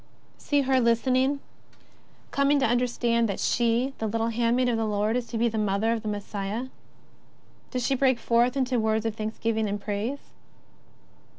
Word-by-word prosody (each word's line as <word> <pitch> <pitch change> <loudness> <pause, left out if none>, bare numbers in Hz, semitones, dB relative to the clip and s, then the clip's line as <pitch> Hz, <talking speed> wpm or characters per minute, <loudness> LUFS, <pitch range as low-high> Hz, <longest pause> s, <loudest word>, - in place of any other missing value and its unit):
See 290 -1 +1
her 265 -1 +2
listening, 255 +4 +2 0.9
coming 280 +1 +3
to 275 - +2
understand 235 -1 +1
that 200 - -3
she, 240 +3 +1
the 220 - -1
little 225 +2 -1
handmaid 235 +2 +1
of 240 -2 +1
the 225 - 0
Lord, 210 +2 0
is 245 -1 -2
to 230 - -4
be 235 +1 +2
the 220 -1 -2
Mother 210 +2 +1
of 230 - -3
the 215 - -7
Messiah. 205 +3 -4 1.0
Does 250 -2 -2
she 275 - +2
break 260 -1 +3
forth 235 +3 +2
into 255 -2 +1
words 220 0 0
of 225 - 0
thanks 220 0 -4
giving 220 -2 0
and 205 +1 -2
praise 215 +7 -4
230 Hz, 175 wpm, -26 LUFS, 220-255 Hz, 1.0 s, coming